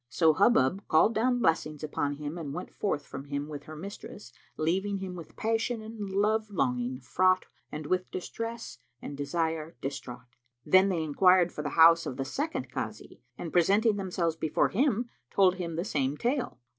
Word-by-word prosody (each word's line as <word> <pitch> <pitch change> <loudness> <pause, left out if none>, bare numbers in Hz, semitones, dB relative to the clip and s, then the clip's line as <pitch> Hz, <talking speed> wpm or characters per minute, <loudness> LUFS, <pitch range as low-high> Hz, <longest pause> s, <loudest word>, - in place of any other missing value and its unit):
So 160 +2 +4
Hubub 195 - +3
called 160 +8 +4
down 245 +3 +2
blessings 155 -4 0
upon 145 -1 -1
him 145 +2 -6
and 155 -4 -5
went 180 - -6
forth 145 -8 -2
from 135 - -8
him 140 0 -3
with 145 -2 -8
her 155 - -9
mistress, 195 -3 -9 0.2
leaving 190 +6 0
him 190 -1 -5
with 170 -3 -10
passion 225 +1 -1
and 215 -2 -6
love 215 +2 +1
longing 125 -8 -1
fraught 185 +8 +2 0.3
and 150 0 -6
with 185 +3 -1
distress 230 +5 -6 0.2
and 145 - -7
desire 160 +2 -2
distraught. 125 -2 -7 0.3
Then 185 +1 +5
they 170 -4 0
enquired 180 +3 +4
for - - -5
the 150 - -3
house 165 +1 +7
of 125 - -5
the 135 - -2
second 290 - -3
Kazi - - -6 0.2
and 165 - -6
presenting 205 +5 +4
themselves 180 -4 -1
before 160 -2 +1
him, 245 0 +1 0.2
told 190 -2 +3
him 170 -3 -4
the 170 +3 -2
same 140 -6 -1
tale. 245 - -1
170 Hz, 175 wpm, -29 LUFS, 150-200 Hz, 0.3 s, house